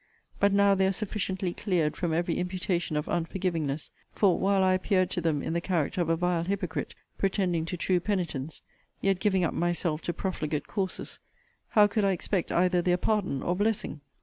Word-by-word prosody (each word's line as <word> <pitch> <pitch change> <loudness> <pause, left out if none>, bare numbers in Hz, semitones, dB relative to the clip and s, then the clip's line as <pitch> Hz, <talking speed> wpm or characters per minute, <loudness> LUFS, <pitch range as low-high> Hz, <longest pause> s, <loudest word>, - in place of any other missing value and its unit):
But 200 0 +4
now 200 0 +5
they 190 0 +3
are - - +2
sufficiently 190 -2 -2
cleared 175 -7 0
from 175 -2 -1
every 170 +1 0
imputation 180 -3 -1
of 150 - -1
unforgivingness; 165 -4 -2 0.2
for, 195 -4 +3
while 195 0 +3
I 185 0 +4
appeared 185 0 +1
to 180 - -1
them 155 -4 0
in - - -2
the 170 - 0
character 175 -1 0
of 165 - 0
a 165 - +3
vile 175 0 0
hypocrite, 185 -2 -3 0.2
pretending 185 -4 +1
to 180 +2 -4
true 180 +1 +1
penitence, 170 -7 -3 0.4
yet 195 -2 +1
giving 190 -3 +2
up 165 - 0
myself 170 -2 0
to - - -2
profligate 155 -7 -2
courses, 190 -2 -4 0.5
how 210 -3 +6
could 205 +1 0
I 195 -1 +3
expect 185 0 -1
either 180 0 +3
their 180 0 +2
pardon 200 -9 0
or 175 - 0
blessing? 205 -7 -1
180 Hz, 185 wpm, -28 LUFS, 170-195 Hz, 0.5 s, how